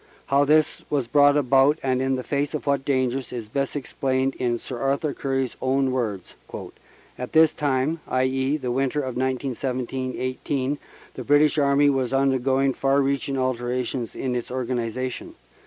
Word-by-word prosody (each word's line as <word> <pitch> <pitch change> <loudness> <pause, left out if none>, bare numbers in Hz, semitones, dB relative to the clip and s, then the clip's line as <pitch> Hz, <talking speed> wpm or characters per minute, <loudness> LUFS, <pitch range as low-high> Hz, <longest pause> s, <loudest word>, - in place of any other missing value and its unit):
How 140 +1 +3
this 155 +1 +3
was 140 -4 0
brought 145 +3 +5
about, 135 +2 +4
and 130 -1 +1
in 130 0 0
face 145 +3 -1
of 150 - -5
what 140 -1 +1
dangers, 130 -1 -1
is 120 -3 -5
best 135 +6 -2
explained 135 -1 -1
in 120 -2 0
Sir 125 0 -7
Arthur 140 +3 0
Currie 135 -1 -1
s 125 - -10
own 135 0 +1
words: 110 -8 -3 0.9
"At 125 - -6
this 160 -1 +6
time 145 +3 0
(i.e., 130 +2 +1
the 125 -4 -3
winter 135 +3 0
of 130 -3 -4
1917 130 0 -2
18) 130 +2 -2 0.3
the - - -6
British 150 +1 +4
Army 140 0 +4
was 130 -2 -1
undergoing 135 0 +2
far 135 +1 +2
reaching 140 0 0
alterations 125 -1 -2
in 130 -2 -2
its 120 -1 -3
organ 125 -1 -2
ization. 120 +2 -4
135 Hz, 160 wpm, -24 LUFS, 130-140 Hz, 0.9 s, this